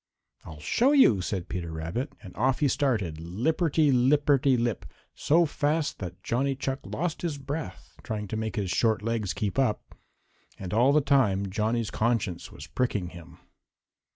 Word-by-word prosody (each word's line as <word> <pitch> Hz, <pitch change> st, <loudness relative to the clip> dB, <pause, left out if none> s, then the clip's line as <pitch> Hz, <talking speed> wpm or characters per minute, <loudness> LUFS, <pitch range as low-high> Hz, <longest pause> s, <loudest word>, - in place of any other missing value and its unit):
"I'll 80 Hz, -2 st, -10 dB
show 245 Hz, -, +2 dB
you," 120 Hz, -, +5 dB
said 90 Hz, -1 st, -3 dB
Peter 85 Hz, -2 st, -4 dB
Rabbit, 85 Hz, -, -4 dB
and 90 Hz, -3 st, -11 dB
off 130 Hz, +4 st, +1 dB
he 145 Hz, -, +3 dB
started, 110 Hz, -, 0 dB
lipperty 145 Hz, -, +1 dB
lipperty 135 Hz, +1 st, +3 dB
lip, 115 Hz, -7 st, -2 dB, 0.3 s
so 170 Hz, +3 st, +3 dB
fast 150 Hz, 0 st, -1 dB
that 90 Hz, -2 st, -7 dB
Johnny 135 Hz, +3 st, 0 dB
Chuck 135 Hz, 0 st, -3 dB
lost 170 Hz, 0 st, -3 dB
his 165 Hz, -4 st, -2 dB
breath 135 Hz, -, -7 dB
trying 105 Hz, -2 st, -4 dB
to -, -, -3 dB
make 110 Hz, +1 st, -3 dB
his 100 Hz, -5 st, -2 dB
short 110 Hz, +2 st, +1 dB
legs 115 Hz, -4 st, -1 dB
keep 105 Hz, +4 st, -2 dB
up. 130 Hz, -6 st, -1 dB, 0.6 s
And 95 Hz, -1 st, -6 dB
all 120 Hz, +5 st, +4 dB
the 150 Hz, +1 st, +4 dB
time 100 Hz, -9 st, +2 dB
Johnny's 110 Hz, +2 st, -1 dB
conscience 110 Hz, -7 st, -1 dB
was 70 Hz, -, -10 dB
pricking 100 Hz, -2 st, -1 dB
him. 85 Hz, -2 st, -13 dB
115 Hz, 160 wpm, -27 LUFS, 95-140 Hz, 0.6 s, you